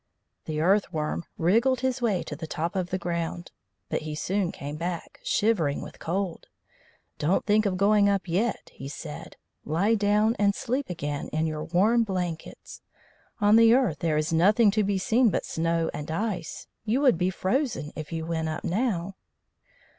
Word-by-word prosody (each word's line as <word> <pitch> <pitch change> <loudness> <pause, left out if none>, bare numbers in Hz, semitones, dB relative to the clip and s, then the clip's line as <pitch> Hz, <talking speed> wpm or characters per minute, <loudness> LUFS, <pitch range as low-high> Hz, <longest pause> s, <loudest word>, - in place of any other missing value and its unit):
The 155 -1 -3
Earth 195 +5 +3
worm 155 +2 -2
wriggled 230 +10 +2
his 260 0 -1
way 210 -7 +1
to 150 - -6
the 160 +2 -7
top 170 +4 -3
of 185 -2 -1
the 185 - -1
ground, 170 -1 -4 0.4
but - - -2
he 155 -1 -5
soon 190 +3 -1
came 145 +1 -6
back, 170 +2 -5
shivering 180 -10 +1
with - - -11
cold. 180 +1 -3 0.7
"Don't 165 +6 +1
think 215 0 +3
of 185 -2 -1
going 200 +1 +4
up 195 -1 0
yet," 200 +6 -1
he 135 - -8
said; 150 +1 -8 0.3
"lie 180 +9 +1
down 210 +1 +2
and 200 -1 +3
sleep 260 +1 -2
again 145 -4 -4
in 155 +1 -1
your 155 -1 -3
warm 210 +8 +3
blankets. 180 -5 -5 0.6
On 205 +1 +6
the 230 +1 +7
earth 240 - +1
there 160 -2 +1
is 155 +1 0
nothing 205 +6 +5
to 215 +1 +1
be 200 0 0
seen 230 +5 +3
but 180 - -1
snow 165 0 0
and 150 - -6
ice. 175 -1 -3 0.2
You 230 +5 +1
would 255 - +4
be 180 0 +2
frozen 190 - -1
if 155 0 -7
you 165 -1 -3
went 160 -1 -2
up 155 - -4
now." 195 -3 -1
185 Hz, 175 wpm, -26 LUFS, 160-215 Hz, 0.7 s, the